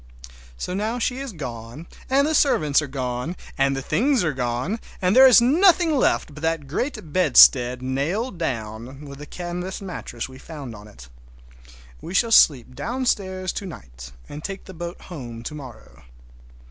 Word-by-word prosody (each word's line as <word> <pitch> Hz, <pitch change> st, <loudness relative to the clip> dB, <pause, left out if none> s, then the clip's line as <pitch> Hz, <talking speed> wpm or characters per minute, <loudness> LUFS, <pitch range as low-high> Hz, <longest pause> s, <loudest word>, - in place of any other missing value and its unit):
So 180 Hz, -, -4 dB
now 215 Hz, +5 st, -2 dB
she 250 Hz, +2 st, -1 dB
is 270 Hz, -2 st, -5 dB
gone, 125 Hz, -, -8 dB, 0.2 s
and 275 Hz, +2 st, +3 dB
the 315 Hz, -, 0 dB
servants 155 Hz, -, +3 dB
are 150 Hz, -, -5 dB
gone, 130 Hz, +4 st, -4 dB, 0.2 s
and 135 Hz, 0 st, +2 dB
the 135 Hz, -, -4 dB
things 255 Hz, -, +2 dB
are 160 Hz, -3 st, 0 dB
gone, 125 Hz, -, -2 dB, 0.2 s
and 185 Hz, 0 st, +1 dB
there 265 Hz, +1 st, +9 dB
is 250 Hz, -, +8 dB
nothing 330 Hz, +5 st, +4 dB
left 255 Hz, -, +1 dB
but 150 Hz, -, -10 dB
that 160 Hz, -2 st, -1 dB
great 160 Hz, -, -4 dB
bedstead 125 Hz, -7 st, +6 dB
nailed 170 Hz, -, -2 dB
down, 125 Hz, 0 st, -5 dB
with 140 Hz, -1 st, -10 dB
the 150 Hz, -, -9 dB
canvas 180 Hz, +3 st, -5 dB
mattress 180 Hz, -, -6 dB
we 130 Hz, 0 st, -13 dB
found 140 Hz, -5 st, -8 dB
on 105 Hz, 0 st, -12 dB
it. 65 Hz, -13 st, -14 dB, 0.9 s
We 180 Hz, -, -7 dB
shall 230 Hz, +3 st, +2 dB
sleep 130 Hz, -, +5 dB
downstairs 195 Hz, -6 st, -2 dB
to 195 Hz, -, -5 dB
night, -, -, -11 dB, 0.2 s
and 150 Hz, +1 st, -9 dB
take 195 Hz, 0 st, -6 dB
the 190 Hz, -, -10 dB
boat 175 Hz, +1 st, -7 dB
home 120 Hz, -9 st, -8 dB
to 135 Hz, -, -6 dB
morrow. 135 Hz, -5 st, -11 dB
160 Hz, 170 wpm, -23 LUFS, 130-200 Hz, 0.9 s, there